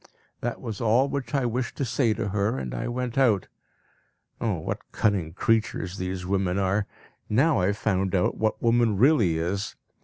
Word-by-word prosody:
That 120 0 -3
was 110 -6 -6
all 115 +4 +3
which 140 +1 -3
I 135 -2 +1
wished 120 +1 -2
to 140 - 0
say 120 0 +1
to 100 - -2
her, 105 +5 0
and 65 -2 -4
I - - -3
went 125 +1 -2
out. 110 -8 +3 0.9
Oh, - - +1
what - - -5
cunning 95 -7 0
creatures 110 -1 0
these 90 0 -3
women 95 -1 0
are! 100 +1 +1 0.4
Now 135 +6 +3
I 90 - +2
have 100 +1 0
found 95 -2 0
out 90 - +1
what 110 0 0
woman 115 -3 +3
really 115 - +4
is. 95 +5 -2
105 Hz, 180 wpm, -26 LUFS, 95-120 Hz, 0.9 s, really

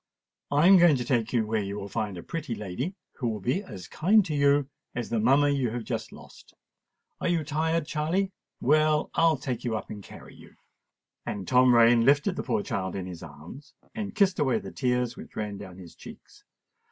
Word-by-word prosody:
I 145 +3 +3
am 190 +1 +8
going 170 -4 +6
to 125 -2 -3
take 120 -2 0
you 115 -3 +1
where 110 0 -1
you 100 0 -4
will 100 -1 -6
find 100 -1 -3
a 85 - -8
pretty 155 -8 -4
lady, 105 - -4 0.2
who 125 - -2
will 110 -2 -2
be 125 - -1
as 100 - -10
kind 200 +5 +3
to 155 - -3
you 140 -1 +3 0.3
as 120 -1 -4
the 115 - +1
mamma 135 +6 +4
you 135 -4 0
have 120 +1 -4
just - - -4
lost. - - -15 0.6
Are - - -2
you 170 -2 +1
tired, 160 +2 -1
Charley? 170 +7 -1 0.3
Well, 155 +2 +2
I'll 165 -2 +3
take 125 -3 -4
you 115 -3 -1
up - - -8
and 105 - -7
carry - - -13
you." - - -17 0.7
And 100 -2 -4
Tom 125 -1 +5
Rain 115 0 +6
lifted 145 - +3
the - - -2
poor 110 -6 -1
child 95 -4 -3
in 95 -2 -4
his 90 -2 -8
arms 85 - -12 0.2
and 210 -3 -5
kissed 195 -2 +2
away 135 -4 +2
the - - -7
tears 125 -2 -1
which - - -12
ran 105 -2 -4
down 95 -3 -10
his 90 -3 -12
cheeks. - - -14
125 Hz, 210 wpm, -27 LUFS, 105-155 Hz, 0.7 s, am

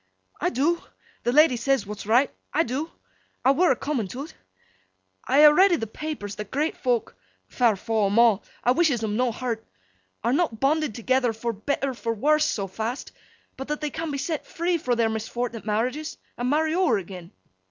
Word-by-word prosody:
'I - - +2
do. 305 +8 0 0.4
The 240 - 0
lady 300 -1 +5
says 245 -1 +1
what's 210 0 -7
right. 245 +5 +3 0.2
I 325 - +2
do. 280 +6 -3 0.6
I 265 - +7
were 340 +4 +3
a - - +3
coming 270 -5 -2
to 260 +9 -6
't. - - -14 0.9
I 285 +3 +5
ha' 300 - +10
read 380 +4 +5
i' 345 - +3
th' 225 -5 -6
papers 295 -10 -5
that 210 -1 -6
great 300 +4 -1
folk 245 -3 -1 0.3
(fair 235 -4 +2
faw 220 +1 0
'em 200 +3 0
a'! 230 -3 +5 0.2
I 245 - +4
wishes 270 -5 +2
'em 210 -1 -1
no 250 +1 +1
hurt!) 230 -1 -4 0.6
are 235 +2 +2
not 285 -8 0
bonded 295 -2 +1
together 250 0 +1
for 230 +1 -3
better 270 +5 -2
for 230 -1 -3
worst 305 +6 +3
so 200 - -2
fast, 220 +7 -5 0.5
but 265 - -6
that 300 0 -2
they 300 -1 -3
can 325 0 -4
be 285 - -3
set 310 +2 -3
free 340 0 -1
fro' 250 -5 0
their 230 -1 +2
misfortnet 225 +1 -4
marriages, 250 +9 -2 0.2
an' 245 +1 -2
marry 310 +2 +2
ower 345 - +3
agen. 180 -2 -8
250 Hz, 195 wpm, -25 LUFS, 225-300 Hz, 0.9 s, ha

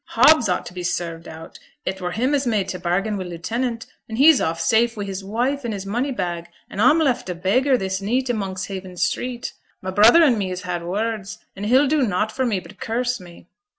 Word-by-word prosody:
'Hobbs 300 -9 +5
ought 180 - 0
to - - -9
be 180 - -6
served 175 -2 -3
out; 160 +1 -10 0.3
it 190 0 -3
were 180 - -2
him 255 +6 0
as 280 -2 +1
made 210 -5 +1
t' 185 -1 -4
bargain 195 +5 -1
wi' 190 - -3
lieutenant; 225 +7 -3 0.2
and 220 - -5
he's 295 +2 +6
off 165 +1 -1
safe 230 0 +2
wi' 205 - -3
his 195 0 -5
wife 245 +8 -1
and 230 -3 -3
his 195 -1 -6
money 240 +8 -1
bag, 175 -7 -3 0.2
and 200 - -3
a'm 255 +7 +6
left 270 - +1
a 180 - -2
beggar 250 +10 +2
this 190 -2 -3
neet 250 +6 0
i' 245 - +1
Monkshaven 190 -2 -5
street. 240 +7 -2 0.3
My 185 - -5
brother 225 - +7
and 250 -8 +4
me 190 -2 -1
has 185 +1 -5
had 180 -2 -3
words, 210 +3 -3 0.2
and 200 +2 -4
he'll 260 +5 +5
do 300 +1 +2
nought 215 -2 0
for 260 +3 -1
me 205 -5 0
but 195 +1 -15
curse 245 +1 -1
me. 175 -1 -14
205 Hz, 225 wpm, -22 LUFS, 185-245 Hz, 0.3 s, brother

